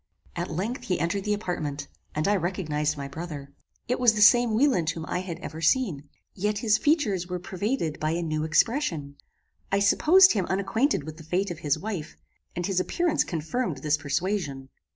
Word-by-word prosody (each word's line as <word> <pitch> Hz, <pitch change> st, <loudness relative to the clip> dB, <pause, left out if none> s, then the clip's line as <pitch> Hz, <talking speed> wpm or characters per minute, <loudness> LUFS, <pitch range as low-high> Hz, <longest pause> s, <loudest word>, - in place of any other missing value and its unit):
At -, -, -3 dB
length 230 Hz, -, -3 dB
he 185 Hz, -6 st, -1 dB
entered 180 Hz, +5 st, -1 dB
the 210 Hz, -, +1 dB
apartment, 150 Hz, -8 st, -4 dB, 0.3 s
and 155 Hz, +3 st, 0 dB
I 205 Hz, -, +3 dB
recognized 155 Hz, -5 st, -1 dB
my 140 Hz, -1 st, -5 dB
brother. 145 Hz, -2 st, -7 dB, 0.3 s
It 250 Hz, -, 0 dB
was 245 Hz, -3 st, +5 dB
the 210 Hz, -, -1 dB
same 240 Hz, +1 st, +6 dB
Wieland 235 Hz, -, +2 dB
whom 165 Hz, -1 st, -4 dB
I -, -, -2 dB
had 180 Hz, -3 st, -5 dB
ever 160 Hz, -1 st, -7 dB
seen. 165 Hz, -, +1 dB, 0.2 s
Yet 210 Hz, +2 st, -1 dB
his 220 Hz, 0 st, +2 dB
features 215 Hz, -, +1 dB
were 180 Hz, 0 st, -3 dB
pervaded 185 Hz, -, -3 dB
by 155 Hz, +1 st, 0 dB
a 170 Hz, +1 st, -1 dB
new 155 Hz, -1 st, -1 dB
expression. 160 Hz, -, 0 dB, 0.5 s
I 195 Hz, -, +3 dB
supposed 335 Hz, -, +6 dB
him 195 Hz, -5 st, -1 dB
unacquainted 200 Hz, -, 0 dB
with 155 Hz, +1 st, -8 dB
the 160 Hz, -, -11 dB
fate 180 Hz, +5 st, -1 dB
of 170 Hz, -, -6 dB
his 145 Hz, -4 st, 0 dB
wife, 185 Hz, -6 st, -5 dB, 0.4 s
and 175 Hz, 0 st, -2 dB
his 190 Hz, -1 st, 0 dB
appearance 335 Hz, -, +1 dB
confirmed 165 Hz, -, -3 dB
this 150 Hz, 0 st, +3 dB
persuasion. 145 Hz, -2 st, -2 dB
180 Hz, 185 wpm, -26 LUFS, 155-210 Hz, 0.5 s, same